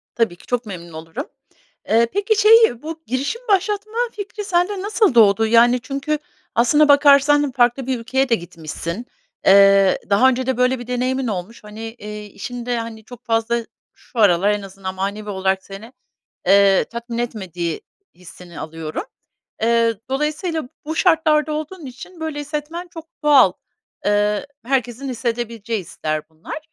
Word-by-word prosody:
Tabii 225 -7 +1
ki, - - -19
çok 245 -1 -2
memnun 170 -4 -8
olurum. 165 - -6 0.6
Eee, 230 +1 +4
peki, 410 +2 +1
şeyi, 445 - +6
bu 320 +1 -7
girişim 275 - -2
başlatma 415 +2 0 0.2
fikri 415 0 -6
sende 375 0 0
nasıl 410 - +1
doğdu? 220 -1 +5
Yani, 240 +2 +5
çünkü 280 +4 -3 0.4
aslına 295 +6 +4
bakarsan 285 0 +5
farklı 245 +1 +1
bir 255 -2 -1
ülkeye 265 +3 0
de 230 - +4
gitmişsin, 170 +3 -6 0.4
eee, 195 0 +6
daha 215 +6 +5
önce 260 0 -1
de 260 -2 -1
böyle 250 0 +2
bir 245 - -9
deneyimin 255 +1 -1
olmuş, 210 +3 -5
hani, 210 +1 -10
eee, 210 -2 -8
işinde, 240 +4 -5
hani, 225 -1 -7
çok 245 +1 -13
fazla 230 0 0 0.3
şu 240 - -10
aralar 200 -1 +4
en 210 - -1
azından 190 -1 -7
manevi 205 +2 -4
olarak 190 -1 -1
seni, 215 +6 -11 0.5
eee, 195 0 +5
tatmin 235 0 -6
etmediği 185 -9 -4 0.3
hissini 180 -1 -12
alıyorum. 160 - -5 0.6
Eee, 230 0 +3
dolayısıyla 305 +1 -2 0.2
bu 315 +1 -3
şartlarda 315 -4 +3
olduğun 310 +2 -5
için 270 +7 -11
böyle 315 -2 -4
hissetmen 300 +4 -5
çok 330 -1 -11 0.2
doğal. 275 -10 +6 0.5
Eee, 205 +4 +1 0.2
herkesin 260 0 -1
hissedebileceği 230 -2 -3
hisler 155 -3 -4
bunlar. 160 - -8
240 Hz, 145 wpm, -20 LUFS, 205-290 Hz, 0.6 s, şeyi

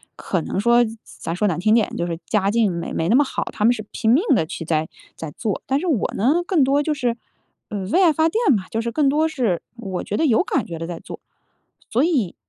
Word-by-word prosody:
可 - - -2
能 - - -3
说， 235 +3 +4
咱 225 0 -7 0.3
咱 165 - -2
说 210 +4 +1
难 175 -4 -1
听 215 +4 +3
点， 225 -2 +3
就 170 - -1
是 165 -1 -4
家 200 -2 +1
境 225 -3 +2
没 170 -1 -4
没 165 - -1
那 225 - +4
么 290 - +6
好， 270 - -3
他 210 - -1
们 240 - +5
是 215 -3 -6
拼 220 - +1
命 285 +10 +4
地 165 - +1
去 165 - -6
在 160 -1 0 0.3
在 160 -2 -7
做。 210 +5 -3
但 270 +1 +1
是 365 - -4
我 280 - 0
呢， 290 - +2
更 345 -6 +3
多 280 +2 +2
就 305 - 0
是， 245 -5 -1 0.5
呃， 210 - -4
为 360 - +3
爱 330 -3 +5
发 320 +1 +2
电 440 - +2
吧， 190 -3 -3
就 225 - -2
是 235 0 -3
更 280 +3 +2
多 305 +3 +2
是 245 - -1
我 195 -6 -4
觉 205 - -3
得 320 - +2
有 240 +5 +3
感 275 - -1
觉 170 - -6
地 165 - -5
在 170 -1 -6
做。 - - -9 0.7
所 245 +5 +2
以， 275 - 0
230 Hz, 280 characters per minute, -21 LUFS, 190-285 Hz, 0.7 s, 么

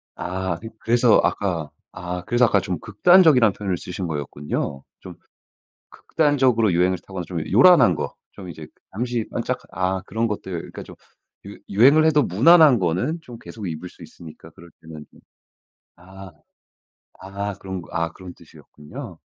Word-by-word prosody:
아 95 -1 -4
그 115 - -8
그래서 120 0 +3
아까 85 -7 -2 0.2
아 90 -1 -6
그래서 120 +1 +3
아까 105 -3 +2
좀 90 -3 -4
극단적이라는 130 - +4
표현을 95 -3 -3
쓰신 90 +1 -6
거였군요. 70 -2 -5 0.2
좀 - - -11 0.7
극단적으로 130 -8 +1
유행을 90 +2 +1
타거나 95 -2 -6
좀 85 -1 -5
요란한 120 - +6
거. - - -5 0.2
좀 95 -3 -11
이제 80 -2 -9 0.3
잠시 120 +1 -3
반짝 - - -3
아 95 +1 -2
그런 115 +1 -1
것들 95 -5 -5
그니까 - - -10
좀 - - -13 0.5
유 - - -10
유행을 140 +10 +4
해도 150 -2 +3
무난한 145 - +5
거는 95 - -1
좀 120 -6 -12
계속 110 -4 -9
입을 85 +2 -6
수 - - -20
있으니까 80 -3 -13
그럴 85 0 -17
때는 80 -2 -11 0.9
아. 95 +2 -13 0.9
아 100 +1 -5
그런 95 -1 -7
거 - - -16
아 85 0 -2
그런 95 -1 -11
뜻이었군요. 75 0 -12
95 Hz, 310 characters per minute, -22 LUFS, 90-120 Hz, 0.9 s, 요란한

